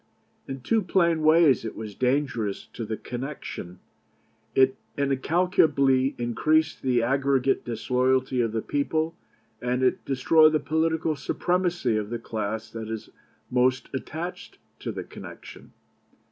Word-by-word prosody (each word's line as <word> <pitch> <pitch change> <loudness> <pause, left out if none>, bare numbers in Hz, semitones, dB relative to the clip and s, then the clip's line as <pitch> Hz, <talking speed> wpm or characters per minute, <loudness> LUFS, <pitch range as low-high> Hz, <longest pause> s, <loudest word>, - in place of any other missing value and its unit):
In 135 -1 -6
two 225 - +2
plain 170 -3 +2
ways 155 -4 +5
it 110 - -5
was 110 -2 -7
dangerous 125 -4 -1
to 115 - -5
the 110 0 -4
connection: 125 -8 -6 0.8
it 130 0 +5 0.2
incalculably 140 -2 +2
increased 155 +7 +1
the 125 -3 +2
aggregate 135 +1 +1
disloyalty 125 +2 +1
of 115 -2 0
the 110 0 -2
people, 155 +3 -1 0.5
and 125 +1 0
it 130 - +2
destroyed 155 +4 +4
the 155 - +3
political 160 +1 0
supremacy 175 -8 0
of 105 -1 -3
the 120 - -2
class 110 -1 -4
that 110 -1 -6
is 110 -1 -6 0.4
most 130 +1 +2
attached 160 +6 -6 0.2
to - - -4
the - - -5
connection. - - -11
130 Hz, 130 wpm, -26 LUFS, 120-155 Hz, 0.8 s, ways